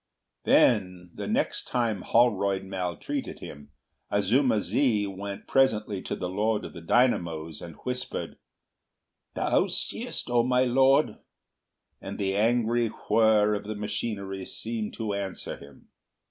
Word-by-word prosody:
Then, 90 -6 +3
the - - -6
next - - 0
time 115 -6 0
Holroyd 100 -5 +2
maltreated 90 -3 -4
him, 75 0 -10 0.4
Azuma 110 +4 +2
zi 110 -2 +1
went 100 0 -6
presently 105 -7 +2
to - - -4
the 90 - -4
Lord 105 +4 0
of - - -9
the 85 - -9
Dynamos 85 - +1
and 85 -3 -9
whispered, 125 0 -4 1.0
"Thou - - +2
seest, - - -1
O 120 -1 +3
my 125 +1 +2
Lord!" 130 -1 +3 0.8
and 100 - -6
the 95 -1 -1
angry 115 +2 +2 0.2
whir 110 -2 +4
of 105 - -3
the 110 +1 -4
machinery 100 -2 -4
seemed 110 +2 -5
to 110 -3 -3
answer 100 -1 -4
him. 70 -1 -16
105 Hz, 130 wpm, -27 LUFS, 95-120 Hz, 1.0 s, whir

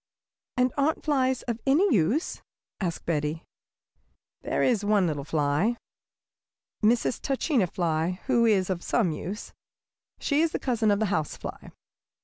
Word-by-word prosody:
"And 250 0 +2
aren't 285 +3 +1
flies 260 -4 +1
of 235 -2 -3
any 310 +6 +4
use?" 215 - +1 0.4
asked 175 -4 -3
Betty. 155 0 -1 1.0
"There - - -1
is 230 -5 +2
one 205 -2 +3
little 150 -4 -2
fly, 155 +10 +1 1.1
Mrs. 230 +2 +2
Tachina 270 - +1
Fly, 170 0 -1
who 235 -3 +3
is 195 -4 +2
of 175 -2 -2
some 175 - +1
use. 185 +7 -6 0.6
She 290 +1 +1
is 330 -1 +1
a - - 0
cousin 235 -4 +1
of 205 - +3
the 220 - +2
house 155 -2 -1
fly. - - -8
210 Hz, 140 wpm, -27 LUFS, 170-255 Hz, 1.1 s, any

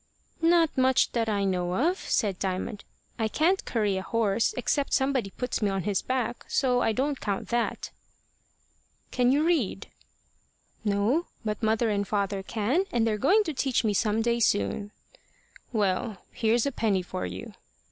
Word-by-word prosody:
"Not 330 -1 +4
much 260 -1 +3
that 230 -2 0
I 200 -2 0
know 180 -2 0
of," 340 - +1
said 200 -4 0
Diamond. 195 +2 -3 0.3
"I 220 - +1
can't 335 - +1
curry 210 -4 0
a - - -2
horse, 220 +1 +1
except 285 -2 0
somebody 265 -6 +1
puts 250 +5 -3
me 210 - +2
on 195 -2 -2
his 200 0 0
back. 250 -2 -2
So 250 -2 +2
I - - +2
don't 270 +5 -1
count 200 -2 -3
that." 240 0 -1 1.2
"Can 250 0 +3
you 290 +3 +3
read?" 280 - 0 0.9
"No. 215 - +1 0.2
But 215 +1 -2
mother 220 +1 +2
can 210 - +1
and 200 -1 -1
father 200 -1 -1
can, 235 - 0
and 235 -2 +2
they're 215 -2 0
going 400 - +4
to 320 - -3
teach 265 -2 0
me 215 -2 +1
some 215 +1 +1
day 235 0 +1
soon." 100 - +1 0.8
"Well, 205 -1 -1
here's 230 0 +1
a 280 - 0
penny 205 -7 0
for 185 +1 -4
you." 225 -2 -8
225 Hz, 165 wpm, -27 LUFS, 200-260 Hz, 1.2 s, Not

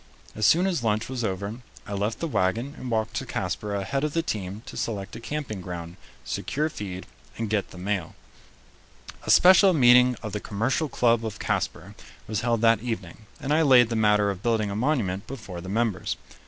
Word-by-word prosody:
As 110 -1 +2
soon 175 +3 +5
as 175 -10 0
lunch 110 0 0
was 130 -2 -3
over, 100 +2 -3 0.3
I 100 - -6
left 105 +3 -2
the 165 - 0
wagon 115 +3 0
and 130 - -7
walked 110 -1 -1
to - - -3
Casper 105 -1 -3
ahead 100 +8 -2
of 150 -1 -1
the 165 - +1
team 100 - -4
to - - -9
select 100 -4 -4
a - - -7
camping 120 -6 -4
ground, 85 -1 -7 0.3
secure 155 +2 -2
feed, 95 -9 -6 0.3
and 110 -2 -3
get 105 -2 0
the - - -12
mail. 95 -2 -3 1.1
A - - -2
special 190 +1 +7
meeting 125 -3 +6
of 110 - -4
the 105 - -2
Commercial 120 +10 -1
Club 120 -2 +2
of 110 -2 -4
Casper - - -2 0.3
was 110 0 -2
held 115 -2 +1
that 115 -2 +4
evening, 110 -3 -5
and 145 0 -1
I 160 - +4
laid 125 -6 +6
the 115 - -2
matter 105 -2 +3
of 95 -1 -7
building 110 -3 0
a - - -3
monument 105 -7 0
before 110 -10 -7
the 95 - -8
members. 110 -1 -1
110 Hz, 195 wpm, -26 LUFS, 100-125 Hz, 1.1 s, special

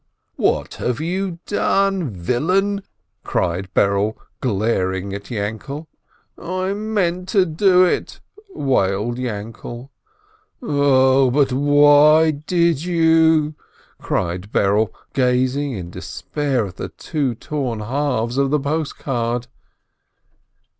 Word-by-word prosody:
"What - - 0
have 125 +2 -1
you 180 +2 -2
done, 195 -5 +1
villain 170 - 0 0.2
!" - - -52
cried 90 +2 -2
Berele, 100 +2 +2 0.2
glaring 100 -4 -1
at 100 0 -7
Yainkele. 110 +7 -4 0.5
"I 185 +2 -2
meant 195 -4 -1
to 195 -3 +3
do 180 +2 +4
it!" - - -2 0.3
wailed 120 - 0
Yainkele. 120 +2 -6 0.7
"Oh, 135 - +3
but 135 0 +2
why 145 +3 +5
did 165 +1 0
you?" 160 -3 +3 0.5
cried 90 +4 -3
Berele, 105 +2 +2 0.2
gazing 130 +2 +1
in 90 -5 -6
despair 135 +3 -2
at 95 - -10
the - - -5
two 140 -6 -3
torn 125 -4 -3
halves 125 0 -1
of 140 -1 +2
the 150 +1 +2
post 150 +2 -2
card. 120 -2 -2
135 Hz, 105 wpm, -20 LUFS, 110-160 Hz, 0.7 s, why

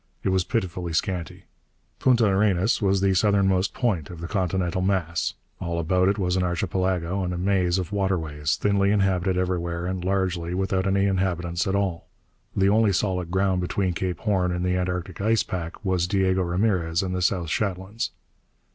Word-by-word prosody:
It - - +1
was 95 -1 +2
pitifully 90 -5 -2
scanty. 90 0 -2 0.6
Punta 125 -3 +4
Arenas 100 +1 +2
was 100 -1 +2
the 95 0 +3
southernmost 95 -1 +2
point 100 - 0
of 85 -2 -9
the 85 - -5
continental 90 -1 -1
mass. 90 -4 0 0.2
All 85 -2 -3
about 90 +3 +2
it 100 +1 +2
was 90 -3 0
an 95 - +1
archipelago 90 +1 -1
and 90 - -2
a - - -4
maze 90 -1 +1
of 95 0 -3
waterways, 80 -7 0
thinly 100 -1 +2
inhabited 95 -2 +1
everywhere 85 -2 -1
and 90 -1 -3
largely 90 -2 -1
without 95 0 0
any 100 0 +2
inhabitants 90 -2 0
at 95 - +1
all. 95 -4 -1 0.5
The 95 0 +3
only 105 0 +4
solid 90 -2 -1
ground 95 0 +1
between 90 +1 -1
Cape 90 +1 -2
Horn 95 -5 +1
and 90 0 -2
the 90 0 +1
Antarctic 90 0 -3
ice 110 +1 +2
pack 85 +1 -6
was 90 -2 +1
Diego 95 -1 +2
Ramirez 90 -2 +1
and 90 -1 -3
the 90 - -2
South 90 -3 0
Shetlands.... 100 +2 -2
95 Hz, 175 wpm, -25 LUFS, 90-100 Hz, 0.6 s, Punta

